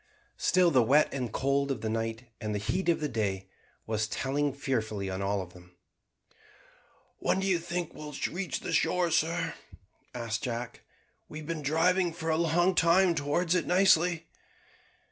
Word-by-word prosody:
Still 180 -2 +4
the 130 -4 +5
wet 140 +7 +3
and 125 -5 -3
cold 140 +2 0
of 130 -6 -2
the 110 - -2
night, 115 +1 -2 0.2
and 105 -1 -2
the 105 0 -4
heat 185 0 0
of 165 - +2
the 150 - 0
day, 100 -6 -2 0.4
was 110 -1 -1
telling 140 +5 -1
fearfully 110 -8 -2
on 95 +1 -4
all 100 0 0
of 90 - -14
them. 90 0 -17 1.4
"When 190 - +1
do 190 - -1
you 185 -3 +2
think 170 0 -4
we 150 0 -8
shall 140 - -3
reach 180 +1 -3
the - - -4
shore, 180 -2 +2
sir?" 165 +2 +1 0.6
asked 115 -2 -3
Jack. 120 -1 -4 0.5
"We 155 - -8
have 155 -1 -8
been 165 -2 -3
driving 170 +4 +2
for 165 -1 -2
a - - +2
long 170 +3 +2
time 175 +2 +4
towards 165 +3 0
it 180 - 0
nicely." 180 -3 +3
150 Hz, 175 wpm, -29 LUFS, 115-170 Hz, 1.4 s, the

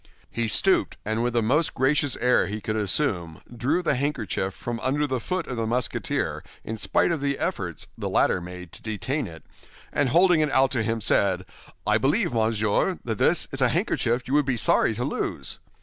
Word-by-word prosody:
He 115 -1 -1
stooped, 190 - +4
and 110 +2 -1
with 120 0 0
the 120 -2 +2
most 150 +8 +1
gracious 140 +1 +2
air 125 +1 +3
he 105 +2 -4
could 110 +1 -3
assume, 95 - 0 0.2
drew 140 +10 0
the 160 - +2
handkerchief 130 -8 -1
from 120 -1 -5
under 145 +5 0
the 130 -3 -2
foot 180 +8 -3
of 125 - -5
the 115 -1 -1
Musketeer 120 0 -2 0.2
in 110 - -5
spite 100 - +2
of 160 -4 -2
the 140 -1 0
efforts - - -3
the - - -4
latter 90 - +2
made 90 0 -9
to - - -13
detain 110 +6 -3
it, 80 -2 -11 0.5
and 145 -3 +2
holding 175 +4 +4
it 155 -1 +2
out 135 -1 +3
to 120 - +1
him, 115 +1 -1
said, 95 -2 +2 0.4
"I 105 +1 +3
believe, 170 - +1
monsieur, 110 -2 +1
that - - -3
this - - +3
is - - -5
a - - +5
handkerchief 120 +2 0
you 130 - -3
would 150 0 +4
be 130 -2 0
sorry 110 0 +2
to 120 - -2
lose?" - - -3
120 Hz, 200 wpm, -25 LUFS, 110-140 Hz, 0.5 s, a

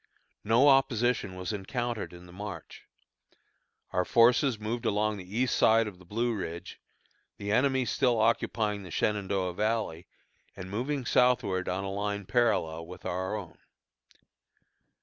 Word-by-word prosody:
No 115 +6 +4
opposition 125 -7 +2
was 90 +4 -4
encountered 120 +3 -3
in 90 0 -12
the 90 - -14
march. 95 -4 -8 1.0
Our 90 - +1
forces 120 +4 +4
moved 115 +3 -4
along 105 -1 0
the 95 +3 -7
east 125 0 +2
side 115 +1 +4
of 95 -4 -9
the 90 - -16
Blue 115 +5 -1
Ridge, 90 -3 -6 0.6
the 100 0 -4
enemy 130 +2 +2
still 120 -2 +1
occupying 110 -2 +1
the 95 - -10
Shenandoah 95 -1 -1
Valley, 105 -4 -1 0.5
and 95 +1 -8
moving 130 +5 -2
southward 115 -8 +2
on 95 +2 -2
a 95 - -3
line 100 0 -3
parallel 85 -9 +1
with 90 - -11
our 95 +3 -2
own. 100 -5 -8
105 Hz, 140 wpm, -29 LUFS, 95-120 Hz, 1.0 s, No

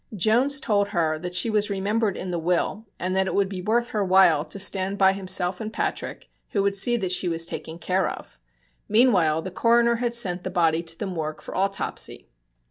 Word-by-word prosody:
Jones 240 +9 +2
told 205 -6 0
her 160 -4 -1
that 180 +2 -6
she 180 - +3
was 210 0 +1
remembered 205 +1 -1
in 185 - -5
the 175 - -2
will 180 +6 -1
and 185 +1 -2
that 190 0 +1
it - - -3
would 200 -1 +2
be 190 -1 -6
worth 235 +5 0
her 210 -2 0
while 185 -5 +4
to 180 +5 -4
stand 195 0 +1
by 190 -1 +4
himself 185 -1 +1
and 215 0 -5
Patrick, - - -4 0.3
who 200 - +1
would 200 0 0
see 240 +5 +2
that 190 -5 -2
she 180 -1 +2
was 165 0 +1
taken 160 0 -7
care 185 +2 0
of. - - -10 0.5
Meanwhile 185 -9 +3
the 185 - -6
coroner 235 +4 +2
had 240 0 -2
sent 180 -6 0
the - - -4
body 165 -3 +1
to 165 -1 -6
the - - -4
morgue 160 -5 -5
for - - -8
autopsy. 195 +1 -2
190 Hz, 215 wpm, -24 LUFS, 175-215 Hz, 0.5 s, while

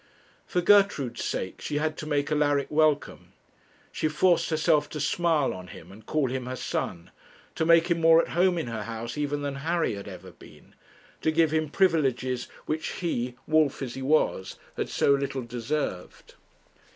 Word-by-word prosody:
For 180 - 0
Gertrude's 175 - +3
sake 95 - -4
she 145 - -3
had 155 +1 -1
to 155 - -6
make 145 -1 -1
Alaric 145 -2 +1
welcome; 150 -1 0 0.6
she - - -1
forced 170 +3 +2
herself 155 -1 +2
to 150 - -6
smile 155 -1 +1
on 90 0 -9
him 90 0 -12
and 105 +3 -14
call 140 +1 0
him 130 -1 -4
her 130 - -4
son; 85 -8 -4 0.4
to 160 - -1
make 170 0 +6
him 170 -1 +1
more 165 0 +7
at - - 0
home 180 +1 +2
in 165 - -2
her 115 -3 -5
house 115 0 -5
even 145 0 -2
than 140 -1 -3
Harry 165 +1 0
had 100 -1 -7
ever - - -10
been; - - -17 0.5
to - - +1
give 160 0 +3
him 155 -1 0
privileges 135 -8 +1 0.2
which 155 +1 -3
he, 125 -8 -3
wolf 155 -3 +2
as 125 -2 -5
he 135 - -7
was, 130 -9 +1 0.2
had - - -3
so 140 - +3
little 140 -2 -2
deserved. 120 -4 -4
145 Hz, 175 wpm, -27 LUFS, 125-160 Hz, 0.6 s, more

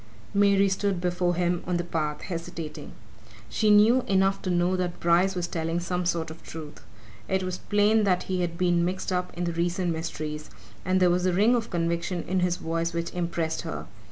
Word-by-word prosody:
Mary 200 -1 +4
stood 195 -1 0
before 175 0 0
him 175 0 0
on 180 -1 +1
the 175 - -1
path, 155 -3 -2
hesitating. 165 -3 -6 0.6
She 215 - +1
knew 215 +5 +6
enough 195 0 +2
to 185 - -3
know 175 +1 +2
that 180 -1 -2
Bryce 175 +3 +3
was 175 -1 -1
telling 165 0 -2
some 180 0 -2
sort 165 -2 -1
of 160 - -11
truth: 155 -2 -9 0.5
it 190 0 +1
was 185 0 -3
plain 210 +1 +3
that 185 -3 +2
he 185 -1 -2
had 170 -1 -2
been 175 -1 +2
mixed 185 +2 -2
up 180 0 -1
in 175 - -1
the 170 -1 -1
recent 175 +1 0
mysteries, 155 -2 -4 0.3
and 185 +1 +2
there 180 -1 +4
was 180 +1 +1
a 180 - +2
ring 210 +7 +4
of 235 -2 0
conviction 170 0 -1
in 185 +1 0
his 180 -1 +1
voice 165 -1 -2
which 170 0 -2
impressed 170 -2 -2
her. - - -5
175 Hz, 200 wpm, -26 LUFS, 170-190 Hz, 0.6 s, knew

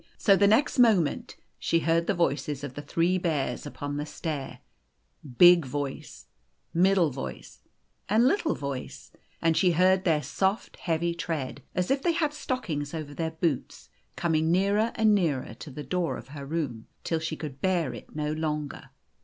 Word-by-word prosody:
So 200 - +5
the 200 +1 +4
next 240 +6 +3
moment 210 -11 +3 0.2
she 165 - +1
heard 165 +1 +1
the 200 - +1
voices 145 -3 -1
of 140 -3 -5
the 145 - -6
three 170 +5 +1
bears 155 -5 -1
upon 145 0 -5
the 145 - -2
stair, 150 -3 -5 0.8
big 175 -1 +8
voice, 140 0 -5 0.5
middle 180 -2 +4
voice, 65 - -7 0.5
and 225 +5 +4
little 335 +1 +1
voice, 140 -2 -6 0.3
and 165 0 +3
she 180 0 +3
heard 185 +2 +4
their 160 -5 +2
soft, 190 - -1
heavy 170 0 -1
tread, 160 -5 -4
as 180 +4 0
if 270 0 +2
they 340 +3 +2
had 310 -3 +1
had - - -16
stockings 165 - -3
over 150 -2 -6
their 160 +1 -2
boots, 160 -4 -3 0.3
coming 160 -1 +1
nearer 200 +5 +2
and 220 -1 +4
nearer 155 - 0
to - - -8
the 145 +2 -7
door 180 0 -1
of - - -11
her 140 -1 -8
room, 140 -8 -3 0.2
till 165 - -1
she 160 0 -3
could 140 -3 -7
bear 175 -9 +1
it 120 - -11
no 150 0 -1
longer. 150 -2 -3
165 Hz, 170 wpm, -27 LUFS, 145-185 Hz, 0.8 s, big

